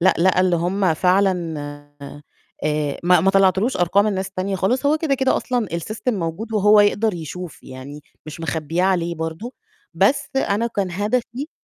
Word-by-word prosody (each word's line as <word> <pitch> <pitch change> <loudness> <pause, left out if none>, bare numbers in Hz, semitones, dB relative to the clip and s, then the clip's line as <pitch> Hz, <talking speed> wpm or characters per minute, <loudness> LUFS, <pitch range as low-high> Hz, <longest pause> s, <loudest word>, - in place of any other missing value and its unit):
لأ، 185 +2 +4
لقى 185 +2 +3
اللي 185 -2 +2
هم 180 +1 +1
فعلًا 180 -1 +1 1.1
آآ، 150 -1 -1
ما 180 -1 +5
ما 190 +4 +3
طلّعتلوش 195 +5 +2
أرقام 190 +4 +2
الناس 195 -2 -2
التانية 190 +1 -3
خالص، 245 +9 0
هو 305 +2 +3
كده، 305 -4 0
كده 265 0 +1
أصلًا 245 -4 -1
السيستم 215 +8 -3
موجود 190 +5 -4
وهو 210 0 +5
يقدر 205 0 +2
يشوف 170 +1 -8
يعني 135 +3 -10 0.3
مش 155 +2 -8
مخبّياه 165 +2 -1
عليه 175 -3 +1
برضه، 160 +9 -5 0.4
بس 280 - +2
أنا 225 -3 +1
كان 200 -5 -2
هدفي 235 - -2
190 Hz, 160 wpm, -21 LUFS, 170-215 Hz, 1.1 s, ما